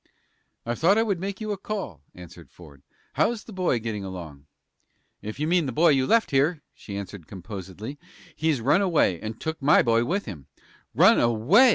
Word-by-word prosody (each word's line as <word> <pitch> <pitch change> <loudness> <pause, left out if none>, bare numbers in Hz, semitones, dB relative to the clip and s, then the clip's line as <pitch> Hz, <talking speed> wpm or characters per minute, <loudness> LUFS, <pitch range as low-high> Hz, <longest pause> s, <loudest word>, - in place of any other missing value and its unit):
"I 120 - -1
thought 175 - +3
I 225 - +4
would 200 -6 -1
make 195 +1 -5
you 215 -1 -4
a 200 - -4
call," 190 - -5
answered 90 -1 -13
Ford. 75 -5 -16 0.3
"How's 230 -2 0
the 220 - -12
boy 185 -9 0
getting 110 -3 -4
along?" 80 -7 -9 0.7
"If 110 +5 -7
you 150 - 0
mean 170 -3 +2
the - - -2
boy 165 +7 +4
you 135 -3 +2
left 230 -1 +3
here," 145 +3 +1
she 100 -2 -8
answered, 100 -4 -8
composedly, 100 - -8 0.4
"he's 155 -6 0
run 145 - +3
away, 160 - +2
and 110 +1 -6
took 160 -1 -4
my 140 +2 +5
boy 115 -1 +2
with 195 +11 -2
him." 80 - -9 0.5
"Run - - +6
away!" 120 - +5
130 Hz, 190 wpm, -25 LUFS, -, 0.7 s, Run